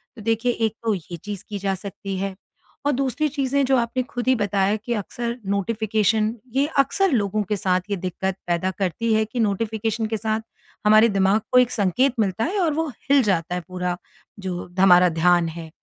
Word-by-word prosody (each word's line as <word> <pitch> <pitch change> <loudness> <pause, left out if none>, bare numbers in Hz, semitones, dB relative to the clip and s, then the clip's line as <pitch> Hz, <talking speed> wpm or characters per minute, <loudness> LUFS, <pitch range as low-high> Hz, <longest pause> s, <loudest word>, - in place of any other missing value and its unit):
तो 225 - -10
देखिए 225 +2 +1
एक 225 -2 -1
तो 225 - +1
ये 175 0 -8
चीज 205 -2 -5
की 205 -1 -4
जा 195 0 0
सकती 195 +1 -6
है। 195 0 -3 0.5
और 290 - +3
दूसरी 275 +3 0
चीजें 280 -1 0
जो 265 0 +3
आपने 240 +2 0
खुद 245 0 -6
ही 260 - +5
बताया 200 -1 +1
कि 230 +3 -4
अक्सर 235 +3 -4
नोटिफ़िकेशन 215 +1 +1 0.2
ये 275 +1 +3
अक्सर 360 +7 +3
लोगों 210 -3 +1
के 205 +1 -2
साथ 185 -2 +1
ये 200 - +2
दिक्कत 185 +1 -2
पैदा 175 +2 0
करती 200 +5 0
है 220 0 +3
कि 230 +3 -6
नोटिफ़िकेशन 220 +1 -1
के - - +1
साथ 220 +1 -1 0.4
हमारे 215 +2 +6
दिमाग 195 +2 +2
को 250 - +7
एक 250 -1 +3
संकेत 230 +6 +2
मिलता 200 0 +1
है 390 +4 -1
और 325 -5 +2
वो 320 +1 -1 0.2
हिल 280 -2 +5
जाता 180 -3 0
है 180 - -2
पूरा 180 -1 -2 0.4
जो 185 -2 -4
ध 180 - -8
हमारा 180 -1 +7
ध्यान 170 +1 +3
है। 165 0 -8
215 Hz, 200 wpm, -23 LUFS, 190-235 Hz, 0.5 s, को